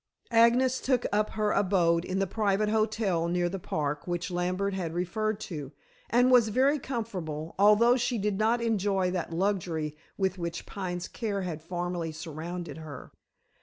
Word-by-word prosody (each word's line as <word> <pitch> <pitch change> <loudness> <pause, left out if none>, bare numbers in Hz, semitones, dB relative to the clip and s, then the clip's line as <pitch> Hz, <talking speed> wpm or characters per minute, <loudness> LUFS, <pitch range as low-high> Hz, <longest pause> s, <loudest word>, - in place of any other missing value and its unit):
Agnes 240 +3 +4
took 255 -2 +1
up 210 +1 +1
her 215 -1 +1
abode 175 -4 +2
in 185 - -2
the 195 - +2
private 210 +1 +1
hotel 215 -6 +1
near 175 0 +1
the 190 +2 -4
Park 150 -3 -3
which 175 +1 -2
Lambert 185 +3 -1
had 170 -4 -3
referred 215 +4 -1
to, 150 -9 -6 0.4
and 245 +3 +4
was 245 -3 +6
very 270 +6 +3
comfortable, 185 - -4
although 210 +4 +6
she 245 -1 0
did 205 -1 -1
not 230 +2 +2
enjoy 195 -4 +1
that 180 -2 -3
luxury 165 -4 -1 0.2
with 190 -1 0
which 170 0 -4
Pine's 180 -3 -4
care 205 -5 -3
had 165 -4 -4
formerly 175 0 -3
surrounded 160 +2 -6
her. 150 -5 -9
190 Hz, 160 wpm, -29 LUFS, 170-215 Hz, 0.4 s, was